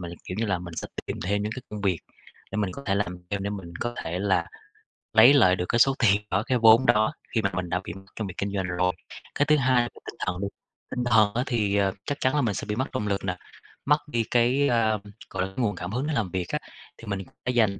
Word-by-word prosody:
mình, 85 Hz, -1 st, -6 dB
kiểu 90 Hz, -, -5 dB
như 115 Hz, -, 0 dB
là, 95 Hz, -3 st, 0 dB
mình 85 Hz, -1 st, -8 dB
sẽ -, -, -3 dB, 0.2 s
tìm -, -, -3 dB
thêm 100 Hz, +3 st, 0 dB
những 105 Hz, +1 st, -2 dB
cái 130 Hz, -, -6 dB
công 105 Hz, -1 st, -5 dB
việc, 95 Hz, -4 st, +1 dB, 0.5 s
để 100 Hz, -, -2 dB
mình 100 Hz, -3 st, 0 dB
có 140 Hz, -, -8 dB
thể 95 Hz, -, +2 dB
làm 100 Hz, -3 st, -1 dB
thêm 100 Hz, -1 st, -1 dB
để 100 Hz, -, -2 dB
mình 95 Hz, -4 st, -6 dB
có 120 Hz, 0 st, -2 dB
thể 85 Hz, +2 st, -3 dB
là 95 Hz, -3 st, +1 dB, 0.7 s
lấy 115 Hz, +5 st, +8 dB
lại 105 Hz, -10 st, +6 dB
được 90 Hz, -, -2 dB
cái 120 Hz, -, +2 dB
số 135 Hz, +2 st, +5 dB
tiền 105 Hz, -4 st, +4 dB
đó, 100 Hz, +3 st, +2 dB
cái 125 Hz, +2 st, +1 dB
vốn 115 Hz, +2 st, +7 dB
đó, 110 Hz, 0 st, +3 dB, 0.2 s
khi 115 Hz, -, +3 dB
mà 100 Hz, -, +1 dB
mình 90 Hz, -1 st, -3 dB
đã 90 Hz, -, 0 dB
bị 85 Hz, -, -6 dB
mất 95 Hz, +2 st, -12 dB
trong 110 Hz, -, -3 dB
việc 95 Hz, -, -6 dB
kinh 100 Hz, 0 st, -2 dB
doanh 95 Hz, -2 st, -1 dB
rồi. 90 Hz, 0 st, +1 dB, 0.4 s
Cái 145 Hz, -, +3 dB
thứ 150 Hz, -, +5 dB
hai 130 Hz, -3 st, +3 dB
là 120 Hz, -, -2 dB, 0.2 s
tinh -, -, -7 dB
thần 90 Hz, 0 st, -2 dB
đi, 100 Hz, -, -1 dB, 0.4 s
tinh 125 Hz, -, -1 dB
thần 110 Hz, -4 st, +4 dB
á 120 Hz, +2 st, 0 dB
thì, 105 Hz, -5 st, +1 dB
à, 100 Hz, -1 st, +3 dB
chắc 145 Hz, 0 st, -3 dB
chắn 130 Hz, +3 st, +2 dB
là 145 Hz, -, +3 dB
mình 115 Hz, -6 st, +1 dB
sẽ -, -, -4 dB
bị 105 Hz, -, -1 dB
mất 130 Hz, +4 st, -2 dB
động 105 Hz, -5 st, -1 dB
lực 100 Hz, -1 st, -1 dB
nè, 90 Hz, -1 st, -2 dB, 0.5 s
mất 145 Hz, +1 st, +5 dB
đi 120 Hz, -6 st, 0 dB
cái, 125 Hz, +4 st, +3 dB
à, 110 Hz, -2 st, +2 dB, 0.3 s
gọi -, -, -2 dB
là, 95 Hz, -, -13 dB
nguồn 115 Hz, -6 st, +1 dB
cảm 90 Hz, +1 st, -5 dB
hứng 125 Hz, +6 st, -1 dB
để 155 Hz, -, -1 dB
làm 105 Hz, -10 st, -1 dB
việc 90 Hz, -2 st, -2 dB
á, -, -, -1 dB, 0.4 s
thì 115 Hz, -, -12 dB
mình 100 Hz, -1 st, -2 dB, 0.3 s
sẽ 125 Hz, -, +1 dB
dành 110 Hz, -5 st, +2 dB
105 Hz, 280 wpm, -26 LUFS, 95-120 Hz, 0.7 s, lấy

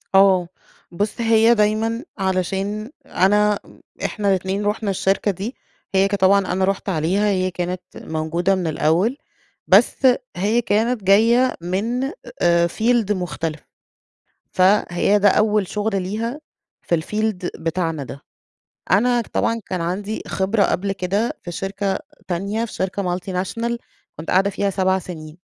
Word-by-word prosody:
آه، 190 Hz, -2 st, +5 dB, 0.4 s
بُص 205 Hz, +7 st, -2 dB
هي 225 Hz, +1 st, +5 dB
دايمًا 225 Hz, +3 st, +1 dB
علشان 195 Hz, +4 st, -2 dB
أنا 210 Hz, 0 st, +2 dB, 0.5 s
إحنا 205 Hz, -2 st, -1 dB
الإتنين 190 Hz, +2 st, 0 dB
رُحنا 210 Hz, 0 st, -1 dB
الشركة 195 Hz, +2 st, +1 dB
دي، 200 Hz, +8 st, -6 dB, 0.4 s
هي 190 Hz, +1 st, +4 dB
ك 200 Hz, -, -1 dB
طبعًا 195 Hz, 0 st, +3 dB
أنا 190 Hz, 0 st, +1 dB
رُحت 195 Hz, +1 st, -2 dB
عليها، 185 Hz, +5 st, +1 dB
هي 185 Hz, -2 st, 0 dB
كانت 180 Hz, 0 st, -3 dB
موجودة 165 Hz, +4 st, -1 dB
من 180 Hz, -3 st, -2 dB
الأول، 165 Hz, -, +1 dB, 0.5 s
بس -, -, +5 dB, 0.4 s
هي 210 Hz, +6 st, +2 dB
كانت 220 Hz, +1 st, 0 dB
جاية 230 Hz, +6 st, +4 dB
من 225 Hz, +10 st, -1 dB, 0.3 s
آآ 170 Hz, 0 st, +4 dB
field 225 Hz, 0 st, +1 dB
مختلف، 165 Hz, -4 st, -3 dB, 0.9 s
فهي 190 Hz, +1 st, +3 dB
ده 205 Hz, 0 st, +5 dB
أول 210 Hz, -1 st, +2 dB
شغل 205 Hz, -1 st, -1 dB
ليها 225 Hz, +9 st, -3 dB, 0.4 s
في 170 Hz, -2 st, 0 dB
الfield 210 Hz, -1 st, -3 dB
بتاعنا 165 Hz, -2 st, -1 dB
ده. 135 Hz, +1 st, -9 dB, 0.7 s
أنا 240 Hz, +5 st, +3 dB
طبعًا 230 Hz, 0 st, 0 dB
كان 185 Hz, -2 st, -3 dB
عندي 200 Hz, +6 st, -3 dB
خبرة 200 Hz, +2 st, 0 dB
قبل 195 Hz, +2 st, 0 dB
كده 195 Hz, +4 st, -1 dB
في 175 Hz, -, -6 dB
شركة 195 Hz, +2 st, -2 dB, 0.3 s
تانية، 200 Hz, +6 st, -1 dB
في 230 Hz, -, -8 dB
شركة 190 Hz, +1 st, -2 dB
multinational، 190 Hz, +6 st, -3 dB, 0.4 s
كنت 160 Hz, -, -5 dB
قاعدة 195 Hz, +2 st, +3 dB
فيها 200 Hz, 0 st, -1 dB
7 190 Hz, 0 st, +1 dB
سنين، 160 Hz, -3 st, -9 dB
195 Hz, 135 wpm, -21 LUFS, 180-215 Hz, 0.9 s, آه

